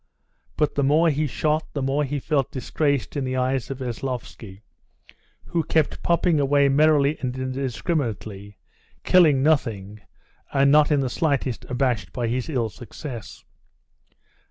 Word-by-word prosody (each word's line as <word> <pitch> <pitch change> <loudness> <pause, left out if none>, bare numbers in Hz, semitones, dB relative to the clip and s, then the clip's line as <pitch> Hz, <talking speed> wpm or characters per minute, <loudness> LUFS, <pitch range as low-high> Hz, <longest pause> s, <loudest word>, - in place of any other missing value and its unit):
But 150 -1 +1
the 140 - 0
more 155 +4 +4
he 150 +1 0
shot, 155 +3 -1
the 140 - -3
more 135 +3 +1
he 145 +1 -2
felt 140 -2 0
disgraced 140 +2 -1
in 140 - -1
the 130 0 -2
eyes 130 -1 -1
of 135 - -4
Veslovsky, 120 -5 -6 0.8
who 170 -1 -1
kept 155 0 0
popping 170 -2 +2
away 140 0 +3
merrily 150 0 +3
and 125 -1 -3
indiscriminately, 125 - -3 0.5
killing 155 -7 +5
nothing, 105 -9 0 0.5
and 140 0 +3
not 150 0 +5
in 145 -2 +2
the 135 - -1
slightest 140 -6 -1
abashed 125 - -1
by 120 - -2
his 125 +5 -2
ill 120 -7 -1
success. 120 +2 -9
135 Hz, 140 wpm, -23 LUFS, 125-150 Hz, 0.8 s, killing